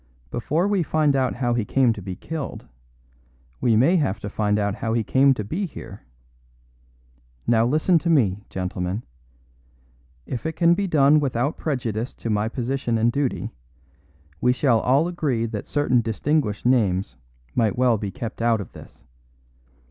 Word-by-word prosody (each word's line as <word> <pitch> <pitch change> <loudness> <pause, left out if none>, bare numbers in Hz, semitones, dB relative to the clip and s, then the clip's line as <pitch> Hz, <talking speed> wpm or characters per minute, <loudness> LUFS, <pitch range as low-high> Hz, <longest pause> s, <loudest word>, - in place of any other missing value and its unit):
"Before 155 - 0
we 205 -2 +1
find 155 -3 +2
out 130 -2 +1
how 120 -1 0
he 120 -2 0
came 125 +1 +2
to 105 - -8
be 95 -1 -6
killed, 160 - -6 0.9
we 115 -3 +2
may 135 +12 +4
have 140 - 0
to 100 - -5
find 105 -1 0
out 100 -1 0
how 110 +2 -3
he 115 -1 +1
came 135 +5 +4
to 105 - -3
be 180 - -3
here. 100 - -10 1.4
Now 115 0 +3
listen 155 +6 +3
to 170 - -2
me, 110 - +3
gentlemen. 90 +2 -3 1.2
If 125 +5 -4
it 160 - -3
can 170 -1 +4
be 200 +2 -1
done 150 -2 +5
without 140 0 -1
prejudice 120 -6 -3
to 115 - -4
my 105 +1 0
position 125 -1 -2
and 115 +2 +2
duty, 140 0 -2 0.9
we 125 - +4
shall 125 -3 +2
all 135 +8 +2
agree 145 -10 -1
that 110 -3 -5
certain 130 -4 +2
distinguished 115 +1 -1
names 100 - +1 0.4
might 115 +1 +1
well 125 -3 +3
be 100 - -3
kept 115 +3 -6
out 115 -1 +2
of 100 - -7
this. - - -15
120 Hz, 165 wpm, -23 LUFS, 110-145 Hz, 1.4 s, done